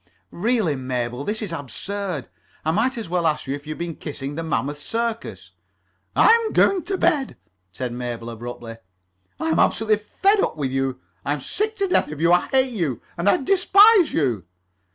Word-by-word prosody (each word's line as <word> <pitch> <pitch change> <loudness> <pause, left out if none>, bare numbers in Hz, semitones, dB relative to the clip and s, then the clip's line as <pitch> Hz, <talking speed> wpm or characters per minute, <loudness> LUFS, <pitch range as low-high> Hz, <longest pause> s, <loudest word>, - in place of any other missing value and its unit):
"Really, 215 - +1
Mabel, 125 -1 -3
this 215 +6 -2
is 200 - -4
absurd. 165 - -4 0.4
I 160 - +2
might 240 +8 +1
as 225 - -4
well 175 -1 +1
ask 155 -1 -1
you 135 - -2
if 145 +1 -7
you 155 - -3
have - - -13
been 170 -2 -4
kissing 140 -2 -6
the 165 - -4
Mammoth 145 -3 -2
Circus." 230 +7 -4 0.6
"I'm 455 -1 +5
going 385 -2 +4
to 390 - -2
bed," 300 -7 +1 0.3
said 125 +5 -4
Mabel 120 -1 -5
abruptly. 115 0 -8 0.6
"I'm 160 0 0
[Pg - - +5
32]absolutely 215 -1 +2
fed 390 - +1
up 165 - 0
with 135 -3 -2
you. 135 -1 -1 0.2
I'm 145 +1 -1
sick 425 - -2
to 395 -2 0
death 360 - +1
of 150 - -7
you. 170 +1 +3
I 175 - +3
hate 260 -2 +2
you. 160 - -1 0.2
And 175 +4 +1
I - - +5
despise 390 +4 +5
you." 120 - 0
165 Hz, 185 wpm, -23 LUFS, -, 0.6 s, I'm